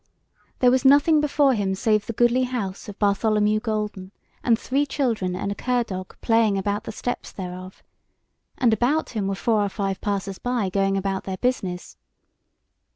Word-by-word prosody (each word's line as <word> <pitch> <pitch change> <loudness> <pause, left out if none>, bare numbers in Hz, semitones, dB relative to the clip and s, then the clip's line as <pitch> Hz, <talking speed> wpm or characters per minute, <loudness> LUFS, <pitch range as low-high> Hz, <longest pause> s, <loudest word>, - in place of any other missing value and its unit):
there 250 -1 +4
was 260 +1 +2
nothing 290 +3 +5
before 285 -2 +3
him 200 -4 -1
save 215 0 +1
the 230 - -3
goodly 240 +3 +3
house 215 -7 -4
of 205 - -9
Bartholomew 210 +1 +2
Golden, 210 -4 -3 0.3
and 230 -2 +3
three 270 +5 0
children 230 -10 -1
and 200 +2 -3
a - - 0
cur 245 +3 0
dog 185 -4 -7
playing 225 -3 +3
about 205 +2 -2
the - - -5
steps 245 - -4
thereof, 185 0 -8 0.7
and 240 -3 +3
about 255 +8 +1
him 210 -4 -2
were 195 - -1
four 220 +1 +1
or 200 - -1
five 195 -1 -3
passers 195 -1 -3
by 240 -6 -1
going 195 0 +1
about 195 0 -2
their 190 -1 -4
business. 185 -8 -2
210 Hz, 170 wpm, -24 LUFS, 195-245 Hz, 0.7 s, nothing